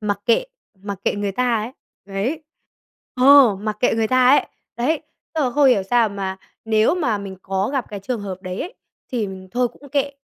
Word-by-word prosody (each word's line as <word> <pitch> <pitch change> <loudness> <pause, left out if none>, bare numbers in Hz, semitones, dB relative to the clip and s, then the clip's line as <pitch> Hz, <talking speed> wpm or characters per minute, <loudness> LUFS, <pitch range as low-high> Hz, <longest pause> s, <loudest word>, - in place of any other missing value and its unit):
mặc 205 -2 -2
kệ 235 - +3 0.4
mặc 200 -2 -5
kệ - - +1
người 205 -1 -2
ta 250 +2 +1
ấy, 230 +4 -6 0.3
đấy, 205 +11 -3 0.7
ờ, 255 -5 +7
mặc 210 +1 -4
kệ 245 - +3
người 225 -1 0
ta 255 0 +4
ấy, 285 - +4 0.3
đấy, 295 +7 0 0.3
tức 320 - 0
là 250 - 0
không 285 +2 +4
hiểu 225 -6 +4
sao 230 +3 +2
mà 195 -2 -4 0.3
nếu 220 +5 +3
mà 245 - 0
mình 195 -1 -7
có 195 +2 -1
gặp 265 -4 -1
cái 205 -2 -6
trường 240 +3 -3
hợp 190 -2 -6
đấy 185 0 -5
ấy, 370 +8 -5 0.4
thì 230 -4 0
mình 190 -1 -9
thôi 245 +4 +1
cũng 285 +4 -16
kệ, 280 +1 0
225 Hz, 210 wpm, -21 LUFS, 200-255 Hz, 0.7 s, ờ